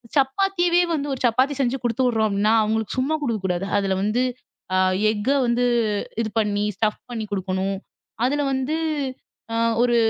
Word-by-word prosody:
சப்பாத்திய 350 Hz, +5 st, +2 dB
வந்து 290 Hz, -1 st, -2 dB
ஒரு 265 Hz, -, -5 dB
சப்பாத்தி 255 Hz, +5 st, +3 dB
செஞ்சு 265 Hz, 0 st, +1 dB
குடுத்து 240 Hz, +2 st, 0 dB
விடுறோம் 225 Hz, -3 st, +2 dB
அப்படின்னா, 205 Hz, +1 st, +1 dB
அவங்களுக்கு 220 Hz, 0 st, -1 dB
சும்மா 275 Hz, +5 st, +1 dB
கொடுக்கக்கூடாது 195 Hz, -8 st, -1 dB
அதில் 195 Hz, -1 st, 0 dB
வந்து 215 Hz, +5 st, +1 dB, 0.5 s
அ -, -, +3 dB, 0.3 s
எஃக்க 215 Hz, +3 st, -1 dB, 0.2 s
வந்து 240 Hz, +1 st, +2 dB, 0.6 s
இது 220 Hz, -, -2 dB
பண்ணி 205 Hz, -1 st, +1 dB
ஸ்டஃப் 210 Hz, +2 st, 0 dB
பண்ணி 225 Hz, -3 st, -4 dB
கொடுக்கணும். 190 Hz, 0 st, -1 dB, 0.5 s
அதில 290 Hz, +3 st, +1 dB
வந்து 265 Hz, +3 st, -1 dB, 0.8 s
அ -, -, 0 dB, 0.2 s
ஒரு 245 Hz, -1 st, +3 dB
230 Hz, 150 wpm, -23 LUFS, 205-265 Hz, 0.8 s, சப்பாத்தி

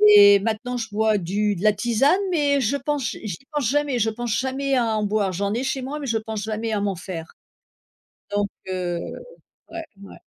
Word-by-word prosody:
Et 200 Hz, -1 st, +9 dB
maintenant 230 Hz, +4 st, -2 dB
je 225 Hz, -2 st, -4 dB
bois 215 Hz, 0 st, +2 dB
du 205 Hz, +4 st, 0 dB
de 180 Hz, -, -6 dB
la 215 Hz, -1 st, +5 dB
tisane, 245 Hz, -, +3 dB
mais 285 Hz, -4 st, +2 dB
je 255 Hz, +3 st, +1 dB
pense 280 Hz, -2 st, -1 dB
j -, -, -8 dB
j'y 195 Hz, -6 st, -4 dB
pense 285 Hz, -6 st, 0 dB
jamais, 285 Hz, -3 st, +1 dB
je 225 Hz, +1 st, +2 dB
pense 235 Hz, 0 st, -2 dB
jamais 270 Hz, +1 st, 0 dB
à 225 Hz, -3 st, +1 dB
en 210 Hz, -, 0 dB
boire. 205 Hz, -2 st, +1 dB
J'en 200 Hz, +3 st, -1 dB
ai 245 Hz, +3 st, -1 dB
chez 265 Hz, 0 st, -2 dB
moi, 295 Hz, +3 st, -4 dB
mais 280 Hz, -, -5 dB
je 225 Hz, -1 st, +1 dB
pense 220 Hz, -1 st, -4 dB
jamais 220 Hz, +1 st, -3 dB
à 205 Hz, -, 0 dB
m'en 200 Hz, -2 st, 0 dB
faire. 170 Hz, -2 st, -7 dB, 1.0 s
Donc, 205 Hz, 0 st, 0 dB, 0.2 s
heu, 175 Hz, -2 st, -2 dB, 0.7 s
ouais 335 Hz, -1 st, -6 dB, 0.2 s
ouais. 200 Hz, -, -11 dB
220 Hz, 210 wpm, -23 LUFS, 205-265 Hz, 1.0 s, Et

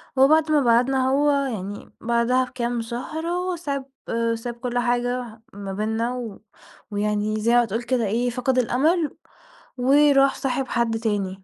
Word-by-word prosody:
وبعد 310 Hz, +4 st, +4 dB
ما 300 Hz, -1 st, +4 dB
بعدنا 255 Hz, +2 st, +3 dB
هو 290 Hz, +2 st, +3 dB
يعني 220 Hz, -8 st, -3 dB
بعدها 235 Hz, +2 st, +2 dB
بكام 240 Hz, -2 st, -3 dB
شهر 260 Hz, +8 st, -5 dB
هو 360 Hz, +1 st, -1 dB
ساب 280 Hz, -5 st, -4 dB, 0.5 s
ساب 235 Hz, +1 st, -5 dB
كل 245 Hz, 0 st, -3 dB
حاجة 245 Hz, -1 st, -1 dB
ما 195 Hz, -1 st, -6 dB
بيننا 220 Hz, +4 st, -1 dB
و 230 Hz, -5 st, -7 dB, 0.5 s
ويعني 210 Hz, +1 st, -1 dB
زي 230 Hz, +3 st, +2 dB
ما 240 Hz, -1 st, +5 dB
تقول 225 Hz, +3 st, -3 dB
كده 245 Hz, -2 st, 0 dB
إيه 235 Hz, +5 st, 0 dB
فقد 255 Hz, +2 st, -1 dB
الأمل 300 Hz, +6 st, +1 dB, 0.6 s
وراح 275 Hz, +1 st, +4 dB
صاحب 265 Hz, 0 st, -2 dB
حد 235 Hz, -2 st, 0 dB
تاني. 200 Hz, -4 st, -2 dB
245 Hz, 145 wpm, -23 LUFS, 225-270 Hz, 0.6 s, ما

